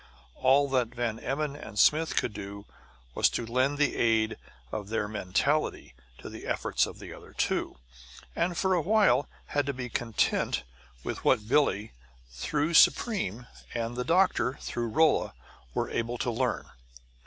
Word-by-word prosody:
All 135 - +3
that 125 -2 0
Van 115 -2 -2
Emmon 140 +2 -2
and 145 - -10
Smith 155 +8 +4
could 110 - 0
do 100 0 -8 0.5
was - - +2
lend 130 +5 0
the 145 - +2
aid 110 -1 +2 0.4
of 105 -2 -5
their 110 -2 -1
mentality 105 - -1 0.2
to - - -10
the - - -9
efforts - - +1
of - - -9
the - - -9
other - - -13
two, - - -1 0.6
and 170 0 0
for 190 -1 +2
a 175 - +2
while 205 -4 +3 0.2
had 145 -1 0
to 140 - 0
be 125 -1 -5
content 115 - 0 0.4
with - - -5
what 105 - +2
Billie, 115 -6 +2 0.4
through 150 - -1
Supreme, 145 - +3 0.3
and 115 0 -2
the 125 - -2
doctor, 165 -4 +2
through 120 -1 -3
Rolla, 155 +7 +2 0.4
were - - 0
able 120 +1 -2
to 120 - -1
learn. 125 +2 -1
125 Hz, 155 wpm, -28 LUFS, 110-150 Hz, 0.6 s, Smith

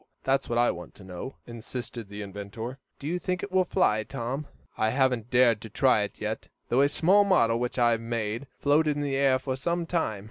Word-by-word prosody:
That's 135 +1 +1
what 120 - 0
I 120 0 +4
want 90 - -9
to 100 - -13
know," 95 +8 -7
insisted 120 -1 -7
the 105 0 -6
inventor. 105 +6 -7 0.2
"Do 140 - -11
you 175 +4 -1
think 180 0 -2
it 200 - -5
will 185 0 +4
fly, 135 - +2
Tom? 130 +5 -4 0.3
I 110 - +1
haven't 125 -2 +1
dared 120 -4 +4
to 110 - -8
try 130 0 +3
it 105 - -4
yet, 110 +1 -4 0.2
though 125 - +4
a 140 - +4
small 190 +7 +4
model 115 -13 +3
which 125 +1 -2
I 120 -1 +4
made 115 +2 -3
floated 150 +1 +3
in 145 - -2
the 140 -1 -1
air 135 -1 +4
for 130 0 -3
some 170 +6 -1
time. 165 - -1
125 Hz, 215 wpm, -27 LUFS, 110-145 Hz, 0.3 s, I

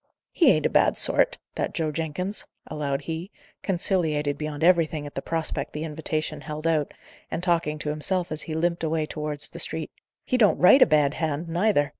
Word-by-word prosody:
"He - - +4
ain't - - +3
a - - +4
bad - - +3
sort, - - +2 0.2
that - - -3
Joe 160 -2 0
Jenkins," 165 +6 -3 0.2
allowed 145 -2 -2
he, 165 +5 -5 0.3
conciliated 160 -6 0
beyond 150 0 -4
everything 165 -4 +3
at 145 - -8
the 135 - -4
prospect 160 -3 -2
the 150 - -4
invitation 155 -1 -3
held 155 +1 -6
out, 155 -3 +1 0.4
and 170 - -4
talking 170 -4 +1
to 150 - -4
himself 170 +4 -1
as 155 - -2
he 155 - -4
limped 170 +1 0
away 160 -1 0
towards 150 -1 -5
the - - -9
street. - - -3 0.3
"He 255 - +1
don't 210 -4 +5
write 220 +10 +7
a - - +8
bad 150 -3 +3
hand, 155 +1 -2
neither! 170 -4 +2
155 Hz, 190 wpm, -25 LUFS, 150-170 Hz, 0.4 s, a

